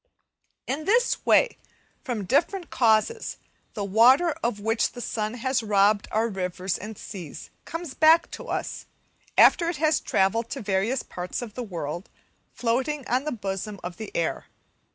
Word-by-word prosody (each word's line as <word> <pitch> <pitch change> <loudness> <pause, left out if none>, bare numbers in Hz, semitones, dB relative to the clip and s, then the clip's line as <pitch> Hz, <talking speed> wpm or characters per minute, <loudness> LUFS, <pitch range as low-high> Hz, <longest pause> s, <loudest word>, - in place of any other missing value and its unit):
In 300 +4 -3
this 475 +5 +2
way, - - +4 0.4
from 240 -8 -3
different 340 - 0
causes, 235 - +2 0.4
the 205 - -2
water 245 - +5
of 230 -3 -1
which 225 +2 0
the - - -9
sun 220 -1 -3
has 255 0 0
robbed 205 -1 +3
our 220 +2 +1
rivers 185 -3 -3
and 210 +1 -8
seas, 180 -8 -9
comes 330 -4 -6
back 320 +4 +5
to - - -8
us, - - -4 0.5
after 335 -1 +6
it 340 - -3
has 310 +1 +2
travelled 225 +5 +1
to 275 - -4
various 205 +6 0
parts 180 +6 -5
of 225 -4 -8
the 250 - -5
world, 175 -4 -5 0.4
floating 260 +4 -1
on 255 +4 0
the 305 - -1
bosom 200 -2 -4
of 175 0 -6
the 220 - -7
air. 165 - -2
230 Hz, 155 wpm, -25 LUFS, 200-280 Hz, 0.5 s, after